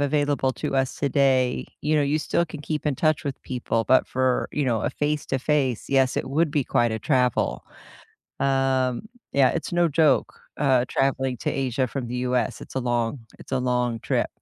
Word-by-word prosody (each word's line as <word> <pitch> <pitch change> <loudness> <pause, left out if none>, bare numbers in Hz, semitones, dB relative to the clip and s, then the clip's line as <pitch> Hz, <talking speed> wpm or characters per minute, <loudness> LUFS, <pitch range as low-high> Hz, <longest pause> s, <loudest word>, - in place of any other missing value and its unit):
available 145 -2 +1
to - - -3
us 135 -1 0
today, 135 -3 +2
you 155 +1 0
know, 150 - +3
you 145 +2 +1
still 170 +2 0
can 155 -2 -9
keep 150 0 -3
in 145 -2 +1
touch 155 -2 +1
with 140 -2 -4
people, 115 -3 -2
but 130 - +4
for, 130 -1 0
you 150 - 0
know, 115 -4 +1
a - - 0
face-to-face, 145 -3 -1
yes, 135 -1 +2
it - - -2
would 160 +2 +2
be 145 -3 0
quite 120 -2 +1
a 110 - -2
travel. 125 -2 +1 0.7
Um, 135 - +1 0.2
yeah, 135 -2 +5
it's 165 - -4
no 175 -1 +3
joke, 150 -2 +2 0.2
uh, 130 -4 +3
traveling 135 -1 0
to - - -2
Asia 130 -1 -1
from 125 0 -5
The 125 +1 -4
US. 125 -1 0
It's - - -11
a 130 - 0
long 120 +1 -1 0.2
it's - - -13
a 130 - +2
long 125 -2 0
trip. - - 0
135 Hz, 190 wpm, -24 LUFS, 125-145 Hz, 0.7 s, yeah